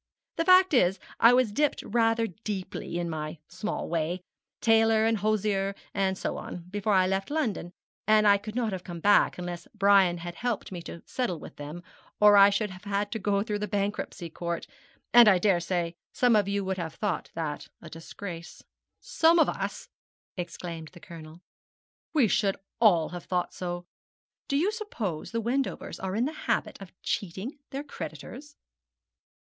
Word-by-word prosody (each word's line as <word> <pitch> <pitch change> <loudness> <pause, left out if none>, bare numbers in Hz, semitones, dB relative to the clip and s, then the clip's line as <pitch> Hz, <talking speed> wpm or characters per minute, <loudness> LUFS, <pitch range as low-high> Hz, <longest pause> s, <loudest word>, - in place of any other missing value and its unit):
The 330 - +1
fact 370 -1 +6
is, 190 -6 +3 0.2
I 230 - +8
was 250 -3 +3
dipped 295 +6 0
rather 225 +1 +2
deeply, 190 -3 -5
in 175 0 -2
my 155 0 -4
small 180 +5 -4
way 170 +2 -1 0.4
tailor, 225 -1 +4
and 225 0 +2
hosier, 200 -2 0 0.2
and 190 -1 0
so - - -3
on 175 - -7
before 205 +1 0
I 185 -1 +5
left 190 +1 -1
London; 240 - -2 0.4
and 215 -1 +5
I 200 0 +6
could 215 +2 -8
not 235 -3 0
have 185 -2 -5
come 175 -2 -7
back 205 +4 +4
unless 175 -1 -6
Brian 195 -3 +5
had 175 0 -6
helped 235 +4 -3
me 175 -2 -5
to 170 - -9
settle 245 -10 -2
with - - -11
them, 150 +4 -7 0.4
or 210 0 +7
I 200 0 +9
should 205 0 -1
have 185 +2 -12
had 205 0 -1
to 220 - -3
go 200 0 +1
through 210 -1 -3
the 210 - -2
Bankruptcy 200 -3 -2
Court; 170 +1 -4 0.5
and 240 -1 +9
I 195 -3 +7
daresay 175 -2 +1 0.2
some 245 -2 +3
of 205 -2 +3
you 200 -1 -1
would 190 0 -2
have 165 -2 -5
thought 200 -7 -2
that 155 -3 -4
a 170 - -12
disgrace.' 165 +1 -9 0.4
'Some 330 +1 +3
of 320 - +5
us!' - - -4 0.5
exclaimed 170 -2 -6
the 175 - -12
Colonel; 165 0 -11 0.7
'we 270 -7 +5
should 200 -1 +1 0.2
all 175 -8 +4
have 175 -1 -8
thought 180 -1 -1
so. 175 -1 -5 0.6
Do 275 - +1
you 360 +8 +2
suppose 235 - -4
the 230 - -2
Wendovers 255 +4 -2
are 190 0 -3
in 230 +3 +1
the 305 - -3
habit 310 - -2
of 195 - -10
cheating 200 - -3
their 275 +2 -4
creditors?' 295 0 -8
200 Hz, 175 wpm, -28 LUFS, 175-225 Hz, 0.7 s, I